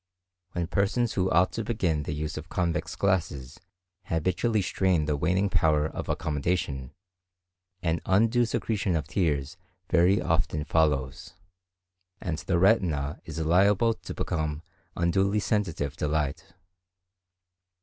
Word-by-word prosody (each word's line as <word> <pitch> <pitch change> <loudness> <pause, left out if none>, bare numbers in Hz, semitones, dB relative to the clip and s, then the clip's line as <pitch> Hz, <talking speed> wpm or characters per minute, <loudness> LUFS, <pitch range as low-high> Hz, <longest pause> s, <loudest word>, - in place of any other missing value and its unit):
When 85 -2 -1
persons 100 +6 0
who 95 -1 +1
ought 90 +3 +3
to 115 - -3
begin 95 -9 0
the 75 - -4
use 75 +1 -4
of 80 +2 -7
convex 85 -2 -1
glasses 80 -9 -1 0.5
habitually 95 +6 0
strain 90 -3 +1
the 75 -1 0
waning 90 +7 +1
power 75 -5 +2
of 80 - -5
accommodation, 75 -3 -2 0.9
an 85 -2 0
undue 115 +5 +3
secretion 105 -5 -1
of 75 - -2
tears 75 -3 -1 0.3
very 90 +3 +4
often 75 -1 0
follows, 70 -6 0 0.8
and 80 -4 -3
the 85 - 0
retina 85 -7 +2
is 80 -1 -7
liable 95 +8 +3
to - - -9
become 75 0 -2 0.3
unduly 95 +4 +2
sensitive 85 -7 -1
to 75 - -1
light. 75 +1 -2
85 Hz, 125 wpm, -27 LUFS, 75-95 Hz, 0.9 s, very